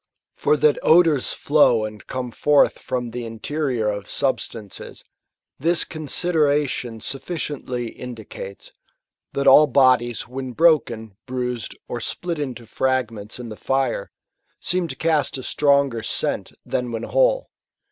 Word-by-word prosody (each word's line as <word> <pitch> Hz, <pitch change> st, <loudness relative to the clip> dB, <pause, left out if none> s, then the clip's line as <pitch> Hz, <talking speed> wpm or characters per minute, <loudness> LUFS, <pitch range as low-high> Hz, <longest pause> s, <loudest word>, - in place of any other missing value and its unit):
For 150 Hz, -, +2 dB
that 150 Hz, 0 st, +3 dB
odours 160 Hz, -5 st, +4 dB
flow 125 Hz, -7 st, +3 dB
and 105 Hz, -1 st, -9 dB
come 125 Hz, -1 st, -4 dB
forth 145 Hz, +4 st, +3 dB
from 125 Hz, -2 st, -3 dB
the 120 Hz, +1 st, -5 dB
interior 120 Hz, +1 st, -2 dB
of 100 Hz, -1 st, -3 dB
substances, 115 Hz, -6 st, -3 dB, 0.6 s
this 170 Hz, +3 st, +2 dB
consideration 150 Hz, -6 st, 0 dB
sufficiently 135 Hz, -4 st, -4 dB
indicates, 110 Hz, -5 st, -9 dB, 0.6 s
that 140 Hz, -, -1 dB
all 145 Hz, +3 st, +8 dB
bodies 125 Hz, -4 st, +3 dB
when 130 Hz, 0 st, -6 dB
broken, 115 Hz, -, +2 dB
bruised, 125 Hz, -3 st, -3 dB
or -, -, -4 dB
split 170 Hz, -3 st, -3 dB
into 125 Hz, -5 st, -4 dB
fragments 115 Hz, -4 st, -1 dB
in 120 Hz, -2 st, -7 dB
the 110 Hz, -, -7 dB
fire, 130 Hz, -1 st, -1 dB, 0.5 s
seem 180 Hz, -1 st, 0 dB
to 135 Hz, -, -5 dB
cast 155 Hz, -4 st, +1 dB
a 130 Hz, -, -7 dB
stronger 140 Hz, -5 st, +2 dB
scent -, -, -2 dB
than 125 Hz, -1 st, -2 dB
when 115 Hz, -1 st, -4 dB
whole. -, -, +2 dB
130 Hz, 125 wpm, -22 LUFS, 115-150 Hz, 0.6 s, all